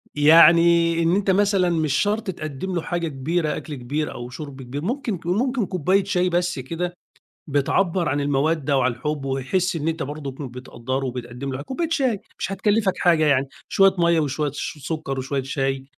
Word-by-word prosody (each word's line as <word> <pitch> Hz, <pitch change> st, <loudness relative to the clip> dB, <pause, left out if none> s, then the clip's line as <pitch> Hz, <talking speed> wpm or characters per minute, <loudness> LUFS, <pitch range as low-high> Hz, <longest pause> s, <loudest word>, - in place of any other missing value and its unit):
يعني 170 Hz, +2 st, +6 dB
إن 165 Hz, +2 st, +3 dB
أنت 195 Hz, -1 st, +2 dB
مثلًا 195 Hz, -2 st, +3 dB
مش 160 Hz, -4 st, 0 dB
شرط 210 Hz, +7 st, 0 dB
تِقَدِّم 155 Hz, +3 st, -5 dB
له 170 Hz, -, 0 dB
حاجة 170 Hz, -1 st, -2 dB
كبيرة 155 Hz, +3 st, -1 dB
أكل 150 Hz, -, -6 dB
كبير 140 Hz, +4 st, -3 dB
أو 120 Hz, 0 st, -7 dB
شُرْب 135 Hz, +1 st, -8 dB
كبير، 130 Hz, +3 st, -6 dB
ممكن 235 Hz, -, -2 dB
ك -, -, -19 dB
ممكن 240 Hz, +5 st, +1 dB
كوباية 185 Hz, +3 st, +1 dB
شاي 185 Hz, -2 st, +1 dB
بس 175 Hz, -3 st, 0 dB
كده، 170 Hz, +7 st, -4 dB, 0.5 s
بتْعَبَّر 165 Hz, +5 st, +1 dB
عن 145 Hz, +2 st, 0 dB
المَّوَدَّة 145 Hz, +1 st, +1 dB
وعن 130 Hz, -2 st, +2 dB
الحب 145 Hz, +4 st, -4 dB
ويحس 135 Hz, +7 st, -1 dB
إن 155 Hz, 0 st, -2 dB
أنت 165 Hz, 0 st, -2 dB
برضك 140 Hz, -1 st, -5 dB
كنت 130 Hz, -4 st, -7 dB
بتقدّره 130 Hz, +1 st, -4 dB
وبتقَدِّم 125 Hz, +2 st, -5 dB
له 130 Hz, -, -4 dB
ح -, -, -5 dB
كوباية 315 Hz, -, -3 dB
شاي، 260 Hz, -10 st, +1 dB, 0.2 s
مش 195 Hz, -, -3 dB
هتكَلِّفَك 205 Hz, 0 st, +1 dB
حاجة 165 Hz, -3 st, +3 dB
يعني، 140 Hz, -2 st, +2 dB, 0.2 s
شوية 195 Hz, -1 st, +4 dB
مَيّة 170 Hz, -1 st, +3 dB
وشوية 145 Hz, 0 st, -1 dB
ش 150 Hz, -, -5 dB
سُكّر 155 Hz, -4 st, -3 dB
وشوية 135 Hz, +1 st, -2 dB
شاي 135 Hz, 0 st, -2 dB
155 Hz, 185 wpm, -23 LUFS, 135-180 Hz, 0.5 s, يعني